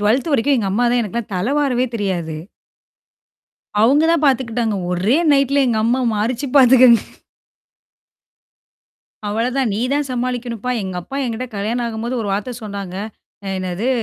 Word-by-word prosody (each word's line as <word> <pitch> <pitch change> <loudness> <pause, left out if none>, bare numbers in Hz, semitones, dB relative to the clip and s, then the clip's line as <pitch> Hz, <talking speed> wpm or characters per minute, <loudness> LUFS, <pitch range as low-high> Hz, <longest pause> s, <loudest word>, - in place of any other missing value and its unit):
12த் 240 +10 +1
வரைக்கும் 275 +1 +2
எங்க 210 -5 -1
அம்மா 240 +4 +2
தான் 245 0 +2
எனக்குல்லாம் 225 +1 -5
தல 190 +9 -1
வாறவே 255 -3 +1
தெரியாது. 180 -7 -2 1.5
அவங்க 275 +7 +4
தான் 335 -2 +2
பார்த்துக்கிட்டாங்க. 235 -4 0
ஒரே 185 +9 +1 0.2
நைட்ல 275 0 +3
எங்க 235 -3 +1
அம்மா 245 +3 +1
மாருச்சு 230 +6 -1
பார்த்துக்கங்க. 255 -2 +7 2.3
அவ்வளோதான், 240 +4 0
நீ - - -2 0.2
தான் 290 0 0
சமாளிக்கணுப்பா. 245 -1 -3
எங்க 190 -1 -5
அப்பா 270 - -8
என்கிட்ட 245 +1 -3
கல்யாணம் 225 +5 -2
ஆகும்போது 230 +2 -4
ஒரு 205 - -4
வார்த்த 205 +5 -3
சொன்னாங்க. 200 -3 -6 0.5
அ - - -7
என்னது? 185 +6 -3
235 Hz, 135 wpm, -19 LUFS, 205-255 Hz, 2.3 s, பார்த்துக்கங்க